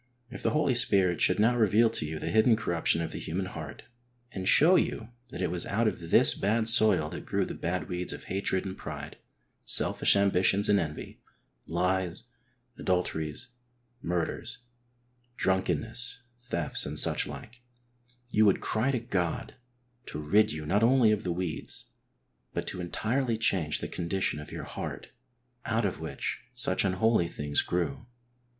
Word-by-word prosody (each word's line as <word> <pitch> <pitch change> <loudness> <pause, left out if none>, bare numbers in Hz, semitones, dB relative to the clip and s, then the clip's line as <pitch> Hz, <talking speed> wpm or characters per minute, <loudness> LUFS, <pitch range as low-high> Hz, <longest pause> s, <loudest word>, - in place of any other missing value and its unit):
If 125 - -8
the - - +1
Holy 150 -3 +1
Spirit 95 -7 +3
should 90 - +4
now 115 +3 +4
reveal 110 0 +4
to 75 - -3
you 80 0 -5
the - - -4
hidden 110 +1 +4
corruption 85 -5 0
of 80 - -5
the - - -6
human 95 +4 -3
heart, - - -8 0.5
and 95 -4 -5
show 165 - +6
you 115 -9 -1 0.2
that 95 - -5
it 90 - -1
was 90 -1 -4
out 110 +3 +1
of 85 -6 -4
this - - +5
bad 110 +2 0
soil 110 -8 +5
that - - -7
grew - - 0
the - - -6
bad 90 +2 -3
weeds 90 0 -3
of - - -7
hatred 95 0 -2
and 95 -1 -5
pride, 75 -4 -8 0.5
selfish - - +4
ambitions 100 0 +3
and 100 -1 +4
envy, 75 -3 -6 0.5
lies, 90 +1 -1 0.6
adulteries, 80 -4 -2 0.5
murders, 90 +7 -3 0.7
drunkenness, 110 +6 -1 0.2
thefts, 85 -10 -3
and - - -5
such - - +4
like, 120 +2 -10 0.7
you 110 - +4
would 100 -3 +4
cry 110 +5 -1
to 135 - +1
God 90 -7 -2 0.5
to - - -6
rid 100 +9 +3
you 75 0 -6
not 100 +7 +1
only 120 -1 +5
of 105 0 0
the 90 - -2
weeds, 85 -2 -4 0.7
but - - -2
to 90 - -5
entirely 115 +7 -1
change 90 -9 +2
the - - -5
condition 90 -2 -2
of 75 - -10
your - - -6
heart - - -7 0.6
out 115 -1 0
of 95 - -2
which - - -4 0.2
such 110 -7 +1
unholy 95 0 +2
things 75 -3 -1
grew. 120 +8 -3
95 Hz, 160 wpm, -28 LUFS, 85-115 Hz, 0.7 s, show